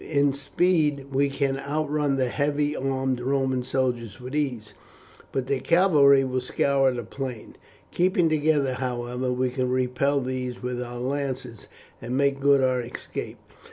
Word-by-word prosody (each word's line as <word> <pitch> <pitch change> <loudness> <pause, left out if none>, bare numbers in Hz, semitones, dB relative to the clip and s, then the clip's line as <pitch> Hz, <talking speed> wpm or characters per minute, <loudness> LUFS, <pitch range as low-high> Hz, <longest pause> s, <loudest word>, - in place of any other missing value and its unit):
In 145 -2 +2
speed 145 -1 0
we 140 +1 +2
can 135 -1 -1
outrun 145 0 -1
the 130 -2 0
heavy 145 +2 0
armed 130 -1 -1
Roman 130 0 0
soldiers 125 -3 -2
with 130 +3 -7
ease, 125 -8 -2 0.6
but 135 -2 -1
their 135 0 0
cavalry 145 -5 +5
will 130 -1 -1
scour 135 +1 +2
the 120 -1 -4
plain. 125 0 -7 0.4
Keeping 180 -1 +2
together, 150 -3 +2
however, 125 0 -3
we 125 0 0
can 125 0 -1
repel 130 +2 +1
these 125 -1 -4
with 125 0 -3
our 120 0 -6
lances, 130 -2 -4 0.3
and 125 +3 -3
make 140 0 +2
good 140 -1 +4
our 130 -1 +2
escape. 120 0 -6
135 Hz, 150 wpm, -25 LUFS, 125-140 Hz, 0.6 s, cavalry